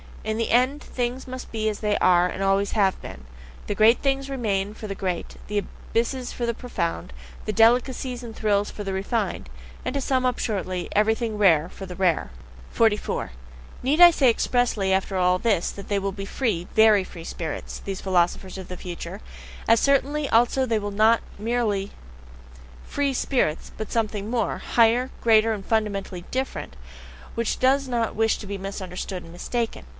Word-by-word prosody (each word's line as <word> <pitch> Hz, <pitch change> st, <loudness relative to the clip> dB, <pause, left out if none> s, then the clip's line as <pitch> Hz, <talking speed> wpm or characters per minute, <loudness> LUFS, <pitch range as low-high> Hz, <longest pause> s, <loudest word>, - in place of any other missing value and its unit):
In 215 Hz, 0 st, -2 dB
the 230 Hz, -, -1 dB
end 255 Hz, +5 st, +2 dB
things 250 Hz, +1 st, -3 dB
must 255 Hz, 0 st, -7 dB
be 220 Hz, -1 st, -1 dB
as 210 Hz, -1 st, -1 dB
they 210 Hz, -1 st, +1 dB
are 180 Hz, -1 st, +4 dB
and 185 Hz, -, -5 dB
have 195 Hz, -, +2 dB
always 195 Hz, +1 st, +1 dB
been 190 Hz, -, -1 dB, 0.4 s
the 205 Hz, -, -3 dB
great 220 Hz, +3 st, +5 dB
things 275 Hz, 0 st, 0 dB
remain 210 Hz, -6 st, -1 dB
for 220 Hz, -, -8 dB
the 200 Hz, -2 st, -4 dB
great, 180 Hz, -3 st, -3 dB
the 210 Hz, -, -2 dB
abysses 245 Hz, +5 st, -3 dB
for 240 Hz, -, -3 dB
the 235 Hz, -, 0 dB
profound, 180 Hz, -7 st, -3 dB, 0.3 s
the 215 Hz, -, -2 dB
delicacies 245 Hz, +2 st, +2 dB
and 225 Hz, -2 st, -8 dB
thrills 205 Hz, -1 st, +1 dB
for 205 Hz, -, -7 dB
the 195 Hz, -1 st, -3 dB
refined, 190 Hz, -, -2 dB, 0.3 s
and, -, -, -3 dB
to 280 Hz, -, 0 dB
sum 260 Hz, -1 st, +1 dB
up 250 Hz, -1 st, +1 dB
shortly, 185 Hz, -4 st, -2 dB
everything 220 Hz, +1 st, +1 dB
rare 170 Hz, -5 st, +4 dB
for 195 Hz, -, -9 dB
the 180 Hz, -, -7 dB
rare. 180 Hz, -, +1 dB, 0.4 s
44. 215 Hz, -, +1 dB, 0.5 s
Need 285 Hz, +5 st, +1 dB
I 350 Hz, 0 st, +10 dB
say 275 Hz, -6 st, +4 dB
expressly 230 Hz, -5 st, +1 dB
after 190 Hz, 0 st, 0 dB
all 180 Hz, 0 st, +3 dB
this 210 Hz, -6 st, +1 dB
that 200 Hz, -, -10 dB
they 205 Hz, -, 0 dB
will 195 Hz, 0 st, -1 dB
be 195 Hz, +1 st, -6 dB
free, 200 Hz, -7 st, -1 dB
VERY 220 Hz, -2 st, +6 dB
free 170 Hz, -2 st, -10 dB
spirits, 165 Hz, -2 st, -5 dB
these 195 Hz, -1 st, -5 dB
philosophers 185 Hz, +1 st, 0 dB
of 185 Hz, -, -8 dB
the 180 Hz, -, -7 dB
future 175 Hz, +3 st, -7 dB, 0.5 s
as 230 Hz, 0 st, +5 dB
certainly 280 Hz, +1 st, +1 dB
also 245 Hz, +3 st, +3 dB
they 225 Hz, -2 st, +1 dB
will 205 Hz, 0 st, -4 dB
not 220 Hz, +3 st, +4 dB, 0.2 s
be 205 Hz, -, -11 dB
merely 215 Hz, -5 st, 0 dB, 0.9 s
free 285 Hz, -1 st, -1 dB
spirits, 245 Hz, -, 0 dB
but 215 Hz, -, -6 dB
something 215 Hz, -2 st, -1 dB
more, 230 Hz, -3 st, -1 dB
higher, 235 Hz, +2 st, +3 dB
greater, 225 Hz, -1 st, +5 dB
and 205 Hz, -3 st, -4 dB
fundamentally 200 Hz, -5 st, -1 dB
different, 260 Hz, -, -3 dB, 0.6 s
which 230 Hz, -1 st, -1 dB
does 270 Hz, +2 st, +3 dB
not 235 Hz, -3 st, -1 dB
wish 225 Hz, +1 st, +2 dB
to 205 Hz, -, -9 dB
be 200 Hz, 0 st, -4 dB
misunderstood 190 Hz, -1 st, -5 dB
and 165 Hz, -, -12 dB
mistaken? 230 Hz, +6 st, -3 dB
215 Hz, 180 wpm, -24 LUFS, 195-240 Hz, 0.9 s, I